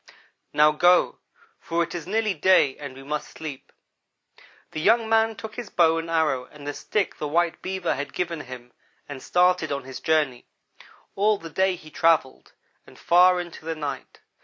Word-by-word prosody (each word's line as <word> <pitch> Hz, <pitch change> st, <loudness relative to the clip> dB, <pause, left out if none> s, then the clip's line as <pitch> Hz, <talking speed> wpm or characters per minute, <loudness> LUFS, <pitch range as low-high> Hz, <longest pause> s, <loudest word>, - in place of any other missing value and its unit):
"'Now 150 Hz, +1 st, +5 dB
go, 175 Hz, +4 st, +3 dB, 0.4 s
for 170 Hz, 0 st, -1 dB
it 165 Hz, -, -7 dB
is 175 Hz, -1 st, -6 dB
nearly 215 Hz, +1 st, 0 dB
day 155 Hz, -5 st, +3 dB
and 140 Hz, -3 st, -8 dB
we 135 Hz, -, -11 dB
must 150 Hz, +2 st, -4 dB
sleep.' 150 Hz, -4 st, -9 dB, 1.0 s
"The 155 Hz, -, -4 dB
young 225 Hz, +5 st, +3 dB
man 225 Hz, 0 st, +2 dB
took 220 Hz, 0 st, -8 dB
his 240 Hz, -5 st, -6 dB
bow 165 Hz, -1 st, +3 dB
and 165 Hz, 0 st, -6 dB
arrow 155 Hz, -6 st, +1 dB
and 145 Hz, -1 st, -14 dB
the 145 Hz, -, -3 dB
stick 205 Hz, +4 st, -2 dB
the 150 Hz, -, -2 dB
white 170 Hz, +2 st, 0 dB
Beaver 190 Hz, -2 st, -2 dB
had 145 Hz, +2 st, -5 dB
given 170 Hz, -3 st, -3 dB
him 125 Hz, -2 st, -11 dB, 0.3 s
and 140 Hz, -2 st, -8 dB
started 180 Hz, -3 st, +2 dB
on 140 Hz, -1 st, -3 dB
his 130 Hz, 0 st, -8 dB
journey. 150 Hz, -6 st, 0 dB, 0.7 s
All 210 Hz, +1 st, +2 dB
the 165 Hz, -3 st, -10 dB
day 190 Hz, +3 st, +1 dB
he 155 Hz, -3 st, -14 dB
travelled, 160 Hz, -6 st, +1 dB, 0.3 s
and -, -, -16 dB
far 180 Hz, +1 st, +4 dB
into 175 Hz, -2 st, -8 dB
the 165 Hz, 0 st, -3 dB
night. 145 Hz, -2 st, -6 dB
165 Hz, 180 wpm, -24 LUFS, 145-180 Hz, 1.0 s, Now